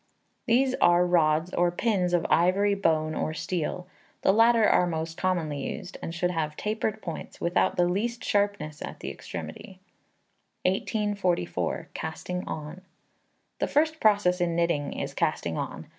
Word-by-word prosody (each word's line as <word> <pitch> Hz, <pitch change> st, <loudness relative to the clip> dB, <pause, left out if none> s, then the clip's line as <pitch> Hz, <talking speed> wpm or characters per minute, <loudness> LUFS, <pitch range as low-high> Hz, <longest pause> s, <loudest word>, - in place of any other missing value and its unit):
These 255 Hz, +3 st, +3 dB
are 175 Hz, +1 st, +5 dB
rods 165 Hz, -1 st, +2 dB
or 175 Hz, 0 st, +3 dB
pins 180 Hz, -1 st, +1 dB
of 170 Hz, -, 0 dB
ivory, 190 Hz, +4 st, +3 dB
bone, 155 Hz, -5 st, +1 dB
or 155 Hz, -, -2 dB
steel. 180 Hz, +1 st, -3 dB, 0.4 s
The -, -, +5 dB
latter 230 Hz, 0 st, +5 dB
are 180 Hz, -, +4 dB
most 160 Hz, -1 st, -3 dB
commonly 165 Hz, -6 st, -1 dB
used, 180 Hz, +5 st, -6 dB
and -, -, -4 dB
should 175 Hz, +1 st, -1 dB
have 155 Hz, -3 st, -2 dB
tapered 215 Hz, 0 st, -2 dB
points, 170 Hz, -3 st, -7 dB
without 170 Hz, +1 st, +1 dB
the 175 Hz, 0 st, +4 dB
least 230 Hz, +7 st, -1 dB
sharpness 200 Hz, -7 st, 0 dB
at -, -, -7 dB
the -, -, -4 dB
extremity. -, -, -8 dB, 0.8 s
1844. 190 Hz, -, -1 dB
Casting 180 Hz, +3 st, -4 dB
On. 155 Hz, +4 st, -6 dB, 0.8 s
The -, -, +1 dB
first 315 Hz, +2 st, +1 dB
process 200 Hz, -4 st, +3 dB
in 170 Hz, -1 st, +1 dB
knitting 170 Hz, -4 st, 0 dB
is -, -, -4 dB
casting -, -, -1 dB
on. -, -, -5 dB
180 Hz, 145 wpm, -27 LUFS, 165-205 Hz, 0.8 s, are